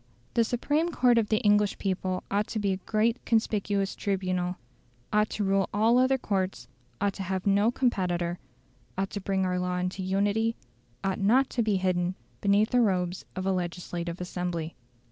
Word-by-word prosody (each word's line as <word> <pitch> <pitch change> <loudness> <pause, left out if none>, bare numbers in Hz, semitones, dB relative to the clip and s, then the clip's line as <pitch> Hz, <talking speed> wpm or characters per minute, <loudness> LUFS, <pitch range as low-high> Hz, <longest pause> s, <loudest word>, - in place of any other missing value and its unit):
The 235 - +4
supreme 290 +8 0
court 245 -5 +4
of 215 - -1
the 215 - +3
English 205 -1 +3
people 185 -1 -2
ought 205 +2 +1
to - - -4
be 200 -2 +1
a - - -2
great 220 +5 0
conspicuous 205 -3 0
tribunal, 185 -2 -1 0.6
ought 210 0 +3
to 210 - -2
rule 195 -1 +2
all 225 +4 +4
other 260 +1 +3
courts, 190 - -2 0.3
ought 200 0 +1
to 195 - -7
have 190 0 -2
no 200 +2 +4
competitor, 180 -9 0 0.6
ought 195 0 -1
to 205 - -4
bring 190 0 0
our 180 0 0
law 180 0 -1
into 180 +2 -2
unity, 205 +4 +1 0.5
ought 190 -1 -1
not 245 +7 +3
to 240 - 0
be 215 -3 +1
hidden 185 -1 0 0.3
beneath 205 +2 +3
the 250 - +4
robes 180 -4 0
of 185 0 -3
a 195 - +2
legislative 175 -1 -3
assembly. 175 -2 -3
195 Hz, 175 wpm, -28 LUFS, 185-215 Hz, 0.6 s, The